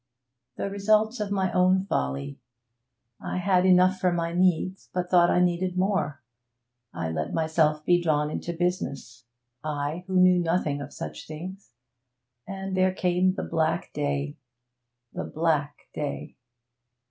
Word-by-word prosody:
'The -, -, -2 dB
result 215 Hz, +4 st, +2 dB
of 210 Hz, -1 st, -2 dB
my 190 Hz, -2 st, 0 dB
own 185 Hz, +1 st, +3 dB
folly. 70 Hz, -, -2 dB, 0.8 s
I -, -, -3 dB
had 180 Hz, 0 st, +3 dB
enough 185 Hz, +1 st, +5 dB
for 180 Hz, -, +2 dB
my 170 Hz, -1 st, -1 dB
needs, 185 Hz, +1 st, +1 dB
but 180 Hz, -1 st, -3 dB
thought 175 Hz, -1 st, +6 dB
I -, -, +3 dB
needed 180 Hz, +1 st, +1 dB
more. 185 Hz, -8 st, 0 dB, 0.7 s
I 80 Hz, -1 st, -3 dB
let 80 Hz, -1 st, -3 dB
myself 155 Hz, -1 st, +1 dB
be 175 Hz, 0 st, +4 dB
drawn 150 Hz, -2 st, +1 dB
into 170 Hz, -, -4 dB
business 150 Hz, -9 st, -3 dB, 0.4 s
I, 150 Hz, +2 st, -3 dB
who 185 Hz, -1 st, +2 dB
knew 180 Hz, 0 st, +6 dB
nothing 165 Hz, -4 st, 0 dB
of 140 Hz, 0 st, -7 dB
such -, -, -7 dB
things 180 Hz, +1 st, -8 dB, 0.7 s
and 195 Hz, 0 st, -4 dB
there 185 Hz, 0 st, +2 dB
came 180 Hz, +1 st, +2 dB
the -, -, -3 dB
black 80 Hz, -, -1 dB
day 70 Hz, 0 st, -2 dB, 0.8 s
the -, -, -4 dB
black 150 Hz, -3 st, 0 dB, 0.2 s
day.' 150 Hz, -1 st, -5 dB
175 Hz, 140 wpm, -26 LUFS, 150-185 Hz, 0.8 s, thought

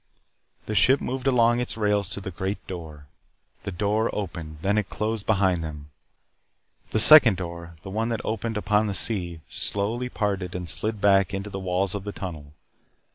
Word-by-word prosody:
The 110 Hz, -, -4 dB
ship 130 Hz, +7 st, +4 dB
moved 130 Hz, +1 st, -3 dB
along 120 Hz, -2 st, +4 dB
its 125 Hz, -2 st, -3 dB
rails 105 Hz, -3 st, +1 dB
to 100 Hz, -, -4 dB
the 95 Hz, -1 st, -6 dB
Great 95 Hz, +3 st, -4 dB
Door. 80 Hz, -5 st, -8 dB, 0.6 s
The -, -, -3 dB
door 105 Hz, +5 st, 0 dB
opened. 85 Hz, -6 st, -5 dB
Then 100 Hz, +2 st, +2 dB
it 105 Hz, -, -4 dB
closed 110 Hz, -1 st, -3 dB
behind 95 Hz, -5 st, +2 dB
them. 75 Hz, -2 st, -7 dB, 1.0 s
The -, -, -1 dB
second 125 Hz, -5 st, +8 dB
door 85 Hz, -2 st, -7 dB
the 95 Hz, -, -7 dB
one 110 Hz, +3 st, -1 dB
that 115 Hz, -2 st, -3 dB
opened 110 Hz, 0 st, -2 dB
upon 105 Hz, +1 st, +1 dB
the 100 Hz, -, -2 dB
sea 90 Hz, -8 st, -1 dB
slowly 115 Hz, +5 st, -1 dB
parted 95 Hz, -6 st, -2 dB
and 90 Hz, -1 st, -4 dB
slid 110 Hz, +3 st, -1 dB
back 95 Hz, 0 st, +4 dB
into 100 Hz, +1 st, -5 dB
the 95 Hz, -, -4 dB
walls 95 Hz, 0 st, 0 dB
of 100 Hz, -2 st, -4 dB
the 105 Hz, -, -5 dB
tunnel. 80 Hz, -8 st, -7 dB
100 Hz, 180 wpm, -25 LUFS, 90-110 Hz, 1.0 s, second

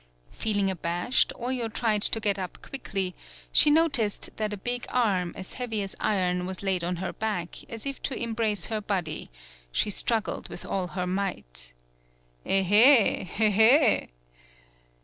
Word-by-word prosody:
Feel 215 Hz, -2 st, -2 dB
ing 195 Hz, -1 st, +2 dB
abashed, 175 Hz, +6 st, +1 dB
Oyo 245 Hz, -2 st, -3 dB
tried 215 Hz, -2 st, 0 dB
to 225 Hz, -, +1 dB
get 205 Hz, -2 st, 0 dB
up 185 Hz, -2 st, -6 dB
quickly; 195 Hz, -8 st, -3 dB, 0.4 s
she 300 Hz, -, +6 dB
noticed 290 Hz, -9 st, +2 dB
that 215 Hz, -1 st, -2 dB
a 210 Hz, -, -4 dB
big 245 Hz, +5 st, -4 dB
arm, 195 Hz, -8 st, +1 dB
as 185 Hz, -, -7 dB
heavy 225 Hz, -5 st, -3 dB
as 195 Hz, -, -6 dB
iron, 180 Hz, -3 st, 0 dB
was 190 Hz, +1 st, -6 dB
laid 190 Hz, -3 st, 0 dB
on 180 Hz, +1 st, -1 dB
her 185 Hz, +2 st, -4 dB
back 205 Hz, -6 st, -4 dB
as 225 Hz, +1 st, -5 dB
if 275 Hz, -1 st, -5 dB
to 270 Hz, -, -3 dB
embrace 220 Hz, -5 st, -1 dB
her 220 Hz, -1 st, -3 dB
body; 180 Hz, -7 st, -3 dB, 0.4 s
she 210 Hz, -, +1 dB
struggled 225 Hz, +2 st, -1 dB
with -, -, -9 dB
all 185 Hz, -2 st, -2 dB
her 180 Hz, 0 st, -3 dB
might. 120 Hz, -, -4 dB, 0.7 s
"Ehelhelhe!" 220 Hz, -, +4 dB
205 Hz, 150 wpm, -27 LUFS, 185-230 Hz, 0.7 s, she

